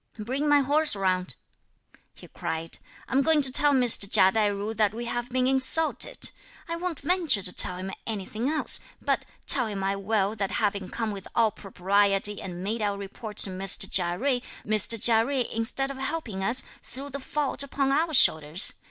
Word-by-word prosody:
"Bring 260 +7 -3
my 290 -1 +5
horse 290 +1 +3
round," 185 - -2 0.8
he - - -14
cried; 165 0 -6 0.3
"I'm 265 +2 +1
going 310 0 +3
to 265 - +3
tell 290 +2 +5
Mr. 245 -7 +4
Chia 190 0 +6
Tai 215 0 +1
ju 205 +2 -4
that 215 -1 0
we 240 +1 -5
have 240 +1 -4
been 255 0 0
insulted. 270 - +2 0.4
I 335 - -4
won't 340 -2 -5
venture 300 - +1
to 180 - -2
tell 180 - 0
him 190 +1 -6 0.2
anything 220 +3 -4
else, 310 0 +1 0.2
but - - -1 0.2
(tell 250 -4 +3
him 200 -2 -5
I 195 +1 -1
will) 200 +1 -1
that 195 -1 -3
having 200 -3 -2
come 225 -2 -3
with 195 -2 -8
all 225 -2 +3
propriety 200 +1 -1
and 180 -1 -7
made 220 +3 -3
our 205 -1 -1
report 205 +2 -9
to 195 - -6
Mr. 195 +1 0
Chia 175 -2 +2
Jui, 255 +1 0 0.2
Mr. 215 +2 +4
Chia 225 +1 +5
Jui 260 0 -1
instead 245 +4 -1
(of 275 - -9
helping 270 -9 -4
us) 235 +6 +1 0.2
threw 275 +3 -9
the 280 - -6
fault 280 +1 -2
upon 275 -1 -1
our 315 +2 +1
shoulders. 155 - +4
225 Hz, 185 wpm, -26 LUFS, 195-270 Hz, 0.8 s, Chia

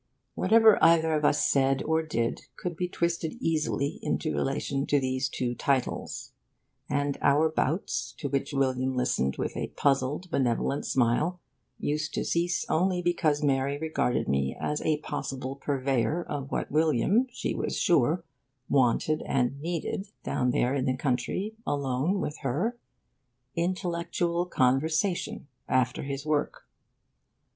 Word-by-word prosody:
Whatever 220 +2 +5
either 160 -1 +5
of 150 -1 0
us 145 - +3
said 135 0 +2
or 160 +1 +1
did 115 -7 -2
could 175 -2 -4
be 180 +2 -1
twisted 170 -2 -1
easily 155 -2 -1
into 155 - -1
relation 135 0 -1
to 145 - +3
those 130 0 -1
two 125 -1 -2
titles; 130 0 -2 0.6
and 145 0 0
our 150 +3 +4
bouts, 160 +3 -1
to 145 - -3
which 140 +1 -1
William 130 -1 0
listened 70 - 0
with - - -3
a - - -2
puzzled, 140 +5 0
benevolent 130 +2 0
smile, 135 +9 +1 0.4
used 150 +1 -2
to - - -1
cease 175 +1 0
only 180 +1 +1
because 155 -4 +1
Mary 140 0 +1
regarded 155 -5 0
me 70 -1 0
as 150 - -2
a 155 -1 +1
possible 135 -3 -4
purveyor 140 +3 0
of 140 -4 -5
what - - -3
William, 160 - +3
she - - -3
was - - -2
sure, 165 +1 +3 0.4
wanted 140 +4 +2
and 135 +1 0
needed, 175 +4 -3 0.2
down 125 - 0
there 125 +1 +1
in 135 -2 0
the 130 -1 0
country, 130 - -1
alone 140 +6 0
with 150 - -4
her: 155 - -1 0.8
intellectual 170 0 -1
conversation, 155 +6 +1 0.2
after 130 0 +1
his 140 +1 -4
work. 150 -1 -1
145 Hz, 135 wpm, -28 LUFS, 130-170 Hz, 0.8 s, Whatever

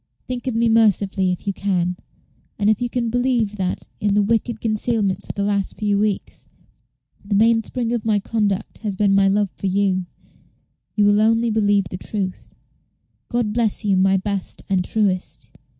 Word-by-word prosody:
Think 250 0 -5
of 250 - -1
me 230 +1 +2
mercifully 205 -4 +2
if 180 - -5
you 200 - -1
can; 180 -2 -1 0.6
and 210 0 +3
if 215 - -1
you 245 - -1
can 235 -2 -2
believe 245 -4 0
that, 185 -2 -2 0.2
in 205 -2 +1
the 205 - +4
wicked 225 +1 0
concealments 215 -3 -1
of - - -5
the 200 - -1
last 200 -1 -1
few 205 -2 +1
weeks, 210 -2 -2 0.7
the 200 0 -1
mainspring 230 +2 +2
of 235 -3 -1
my 215 -2 +2
conduct 205 -1 -2
has 210 -3 -3
been 200 0 +2
my 195 0 +4
love 200 -1 +1
for 195 - -3
you, 190 -1 +1 0.9
you 210 - +3
will 205 +1 +4
only 225 +1 +3
believe 205 -2 +2
the 180 - -4
truth. 190 -1 -4 0.8
God 235 -3 -1
bless 225 -1 0
you, 200 -2 +3
my 190 +1 +3
best 195 0 -3
and 190 -2 +1
truest. 185 - -1
205 Hz, 175 wpm, -21 LUFS, 195-225 Hz, 0.9 s, the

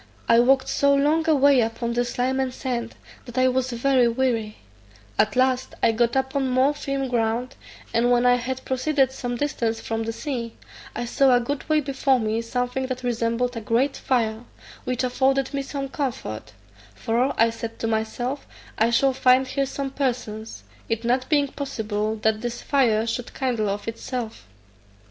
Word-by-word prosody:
I 230 - +6
walked 260 +2 +4
so 280 0 +3
long 310 +3 +2
a 315 - +5
way 280 -2 +5
upon 230 +1 -2
the 240 +1 +1
slime 250 +2 -1
and 260 -1 0
sand 245 -3 -4 0.3
that 240 0 -10
I 255 0 +4
was 255 0 0
very 250 +1 +3
weary: 230 -3 -1 0.6
at - - +3
last 255 0 +1
I - - +5
got 235 +2 +1
upon 265 0 0
more 260 +3 +3
firm 275 -2 -3
ground, 235 +1 -1 0.4
and 235 +1 +3
when 245 0 +3
I 245 - +6
had 260 +2 -4
proceeded 265 0 +1
some 245 -2 -4
distance 235 -4 -1
from 225 0 -3
the 225 0 -2
sea, 235 -2 -4 0.4
I 240 - -2
saw 260 +1 +4
a - - +4
good 275 +5 -4
way 310 0 +3
before 270 -1 +1
me 220 0 -1
something 250 +2 -2
that 255 0 -5
resembled 240 +1 0
a 230 - -4
great 240 +6 +1
fire, 225 -3 0 0.4
which 255 0 -1
afforded 265 +2 +1
me 280 - -1
some 275 0 -4
comfort; 110 - -4 0.4
for 235 - 0
I 230 0 +5
said 230 0 -6
to - - -4
myself, 225 +5 -2 0.3
I 225 +2 +4
shall 265 +3 +3
find 255 +1 +4
here 275 +1 -1
some 275 0 -4
persons, 225 - -3 0.3
it 225 0 -1
not 255 +2 0
being 290 -2 +3
possible 220 -6 -3
that 220 0 +2
this 240 0 -4
fire 230 -6 +2
should 230 +1 -4
kindle 235 -6 0
of 205 +2 -4
itself. 230 - -5
250 Hz, 175 wpm, -24 LUFS, 230-265 Hz, 0.6 s, I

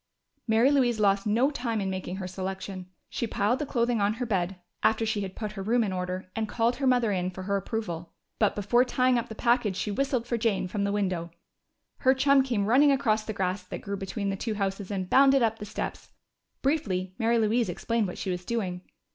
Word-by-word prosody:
Mary 230 +5 +4
Louise 245 -5 +2
lost 200 0 +2
no 240 +7 +3
time 235 -5 -2
in 195 - -1
making 185 -1 -4
her 190 -1 -5
selection. 190 0 -5 0.2
She 235 - -3
piled 215 +4 +1
the 300 - -3
clothing 235 -3 +1
on 205 +2 +2
her 245 +1 -3
bed, 190 -4 -1 0.3
after 220 +1 +2
she 215 -1 -1
had 190 -1 -5
put 215 -2 -4
her 205 -2 -6
room 230 +4 +2
in 200 -3 -2
order, 180 0 -3
and 220 -1 -2
called 235 +1 +1
her 270 - 0
mother 245 -4 +3
in 185 -2 0
for 185 +1 -8
her 200 +1 0
approval. 190 -5 -4 0.3
But 210 - +3
before 210 +5 +3
tying 255 -1 +2
up 235 - -6
the 220 - -7
package 235 -4 +2
she 210 - -2
whistled 260 +1 0
for 235 -1 -1
Jane 210 -5 +1
from 200 +2 -1
her - - 0
window. 185 -5 -1 0.7
Her 260 0 +4
chum 275 +1 +5
came 240 -6 0
running 270 +7 +5
across 220 -6 +1
the 215 - -3
grass 185 -1 -1
that - - -6
grew 200 -1 -3
between 200 +1 -3
the - - -2
two 215 +2 -3
houses 195 -1 -2
and 190 -3 -2
bounded 270 +3 +5
up 225 -1 +1
the 210 - -5
steps. 210 - -5 0.5
Briefly 190 -11 0
Mary 230 +1 +3
Louise 225 0 +2
explained 225 +4 -1
what 180 - -6
she 190 - -3
was 180 0 -4
doing. 185 -4 -2
215 Hz, 220 wpm, -27 LUFS, 190-240 Hz, 0.7 s, chum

